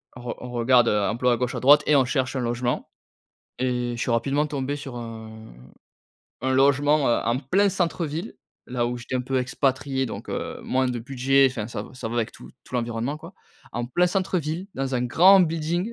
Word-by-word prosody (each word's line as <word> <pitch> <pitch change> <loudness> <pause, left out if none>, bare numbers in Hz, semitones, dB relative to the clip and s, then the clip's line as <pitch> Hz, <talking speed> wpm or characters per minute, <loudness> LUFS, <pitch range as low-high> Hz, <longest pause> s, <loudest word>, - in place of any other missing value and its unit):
On 120 - -10
re 120 - -5
on 125 - -7
regarde, 120 0 +4
heu, 105 - +2
emploi 120 +5 +1
à 120 - 0
gauche, 125 -1 -2
à - - -2
droite 145 +3 +6
et 150 - +4
on 130 -2 +5
cherche 130 0 -1
un - - 0
logement 120 0 -2 0.7
et 125 -1 -1
je 120 - -5
suis - - -1
rapidement 135 +6 +1
tombé 140 -1 -3
sur 140 -4 -8
un 110 - -9 0.9
un 130 0 0
logement, 140 +2 +3
heu, 120 - +4
en 120 +2 +1
plein 190 +9 +2
centre-ville, 170 +1 -2 0.3
là 120 -1 -1
où 120 0 -3
j'étais 125 +2 -6
un 125 - 0
peu 130 +1 -1
expatrié, 135 +1 0
donc, 120 - -7
heu, - - -4
moins 130 0 +1
de 120 -1 -2
budget, 135 +2 +3
enfin 110 -4 -5
ça 105 - -5
v - - -11
ça 125 -3 -5
va 120 - -4
avec 115 -2 -1
tout - - -13
tout 125 - -12
l'environnement, 120 +4 -2
quoi. 165 +4 -12 0.4
En 120 0 -3
plein 175 +9 +2
centre-ville, 180 -2 -1
dans 135 0 -2
un 125 - 0
grand 185 +10 +6
building, 170 +5 -1
130 Hz, 210 wpm, -24 LUFS, 120-145 Hz, 0.9 s, droite